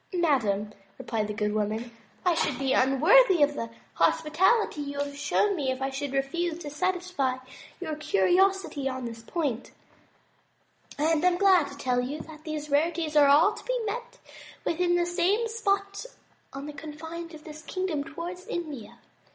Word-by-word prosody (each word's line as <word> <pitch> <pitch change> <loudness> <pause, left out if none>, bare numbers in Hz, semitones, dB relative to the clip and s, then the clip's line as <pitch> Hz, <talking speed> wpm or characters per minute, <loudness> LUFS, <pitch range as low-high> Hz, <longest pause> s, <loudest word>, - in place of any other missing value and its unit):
"Madame," 215 - +1 0.2
replied 220 -3 -2
the 210 - -4
good 210 0 -1
woman, 215 +3 -2 0.3
"I 355 - +4
should 305 -5 0
be 265 0 0
un 270 0 +3
worthy 380 - +6
the 285 -5 -5 0.2
hospitality 325 - +2
you 285 0 -5
have 285 0 -3
shown 295 +8 +1
me 285 -6 -1
if 260 0 -2
I 270 0 -2
should 275 +1 -4
refuse 320 +5 -1
to 290 - -6
satisfy 360 -6 -1 0.4
your 320 -4 -3
curiosity 305 - +2
on 260 -1 -5
this 230 -1 -7
point, 255 -2 -3 1.3
and 315 +2 +2
am 360 -1 +4
glad 370 -5 +5
to 280 0 -10
tell 250 -3 0
you 275 +5 -4
that 310 -1 -12
these 305 -2 -5
rarities 315 +1 +1
are 290 -1 +7
all 310 +9 +6
to - - -10
be - - -1
met 470 +3 -5 0.5
with 335 - -1
in 350 -1 +3
the 350 0 +2
same 365 +6 +1
spot 400 -1 -1 0.4
on 275 +1 -7
the 300 - -7
con 300 +1 -8
fines 330 +2 -7
of 305 - -13
this 310 0 -10
kingdom, 355 -4 -2
towards 345 +4 -7
India. 300 -10 -5
305 Hz, 170 wpm, -27 LUFS, 270-355 Hz, 1.3 s, are